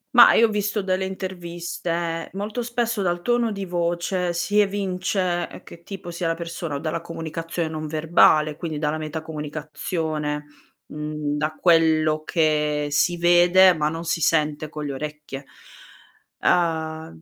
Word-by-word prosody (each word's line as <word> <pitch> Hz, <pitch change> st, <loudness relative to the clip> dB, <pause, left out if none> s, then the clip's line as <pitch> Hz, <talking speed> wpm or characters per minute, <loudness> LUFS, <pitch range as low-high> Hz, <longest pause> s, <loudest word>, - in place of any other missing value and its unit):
Mah, 240 Hz, -, +9 dB
io 230 Hz, -, +6 dB
ho -, -, -6 dB
visto 210 Hz, 0 st, -1 dB
delle 190 Hz, 0 st, 0 dB
interviste. 175 Hz, -3 st, -4 dB
Molto 210 Hz, +5 st, -3 dB
spesso 235 Hz, -2 st, -1 dB
dal 175 Hz, -2 st, 0 dB
tono 240 Hz, 0 st, +1 dB
di 200 Hz, -1 st, -4 dB
voce, 175 Hz, +1 st, -1 dB
si 200 Hz, +5 st, +1 dB
evince 185 Hz, -3 st, -1 dB
che 170 Hz, -, -13 dB
tipo 190 Hz, -2 st, -8 dB
sia 170 Hz, 0 st, -2 dB
la 165 Hz, -, +1 dB
persona, 170 Hz, -2 st, -5 dB
o -, -, -2 dB
dalla 155 Hz, +2 st, -2 dB
comunicazione 165 Hz, 0 st, -4 dB
non 155 Hz, -1 st, -5 dB
verbale, 155 Hz, -1 st, +3 dB
quindi 160 Hz, -3 st, -4 dB
dalla 150 Hz, +1 st, -1 dB
metacomunicazione. 155 Hz, 0 st, -4 dB, 0.4 s
Mhmm, 150 Hz, -1 st, -3 dB
da 155 Hz, +1 st, -1 dB
quello 155 Hz, -2 st, +3 dB
che 150 Hz, -2 st, +1 dB
si 175 Hz, +4 st, +2 dB
vede, 175 Hz, +2 st, +6 dB
ma 150 Hz, -2 st, 0 dB
non 165 Hz, +2 st, -3 dB
si 165 Hz, -, -1 dB
sente 155 Hz, -1 st, +1 dB
con 150 Hz, 0 st, -7 dB
le 145 Hz, -, -3 dB
orecchie. 150 Hz, -1 st, -6 dB, 0.9 s
Uhm, 160 Hz, -, 0 dB
165 Hz, 145 wpm, -23 LUFS, 155-180 Hz, 0.9 s, Mah